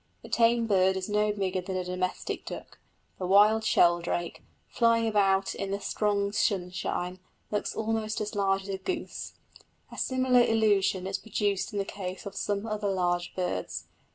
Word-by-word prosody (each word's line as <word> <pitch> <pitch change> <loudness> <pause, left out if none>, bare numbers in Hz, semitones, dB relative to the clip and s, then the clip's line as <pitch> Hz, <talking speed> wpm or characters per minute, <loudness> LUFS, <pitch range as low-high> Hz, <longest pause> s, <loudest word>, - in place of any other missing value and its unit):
The - - -10
tame 235 0 +3
bird 190 -3 +3
is 185 - -3
no 210 0 +2
bigger 190 -2 -1
than 190 +1 -5
a 185 - -1
domestic 180 0 -3
duck; - - -8 0.4
the 185 - -2
wild 210 +3 +5
sheldrake, 175 -4 +2 0.3
flying 230 -1 +3
about 195 -3 +2
in 195 - -4
the 200 +1 -2
strong 200 0 0
sunshine, 180 -2 -1 0.3
looks 210 - -2
almost 220 -1 -1
as 210 -1 -3
large 195 -1 +1
as 200 - -10
a 195 - -2
goose. 345 - -4 0.6
A - - -7
similar 255 -1 +3
illusion 205 -5 +2
is 195 0 -2
produced 205 0 -1
in 205 - -4
the 200 - 0
case 190 -1 -6
of 200 - -6
some 205 +1 -2
other 215 -2 -2
large 175 -2 0
birds. 180 -1 -3
200 Hz, 165 wpm, -28 LUFS, 185-215 Hz, 0.6 s, wild